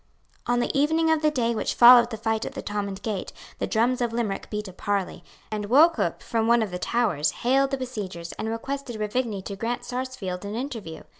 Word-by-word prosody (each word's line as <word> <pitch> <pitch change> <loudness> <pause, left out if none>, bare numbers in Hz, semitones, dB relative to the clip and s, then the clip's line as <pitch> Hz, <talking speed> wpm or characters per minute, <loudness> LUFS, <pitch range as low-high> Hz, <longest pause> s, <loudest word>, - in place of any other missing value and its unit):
On 245 0 +2
the 240 - -1
evening 320 +3 +3
of 320 -1 +2
the 305 - +4
day 240 -5 0
which 220 - -2
followed 240 0 +8
the 220 - -5
fight 220 0 -1
at - - -5
the - - -6
Thomond 200 -2 -4
Gate, 210 -4 -3 0.3
the - - -1
drums 245 +3 +1
of 240 -1 0
Limerick 230 -4 -3
beat 210 -1 -4
a 190 - -10
parley; 195 -2 -2 0.3
and 210 -1 -3
Wauchop, 320 +7 +4
from 225 -2 0
one 235 -1 +4
of 205 - -5
the 180 - -4
towers, 180 -9 +1 0.2
hailed 270 +2 +3
the 275 - -1
besiegers, 200 -10 -6
and 220 - -2
requested 245 +1 -4
Ruvigny 215 -2 -2
to 200 - -6
grant 230 +4 -3
Sarsfield 245 -8 -4
an 205 +1 -5
interview. 230 - -6
230 Hz, 210 wpm, -25 LUFS, 205-255 Hz, 0.3 s, followed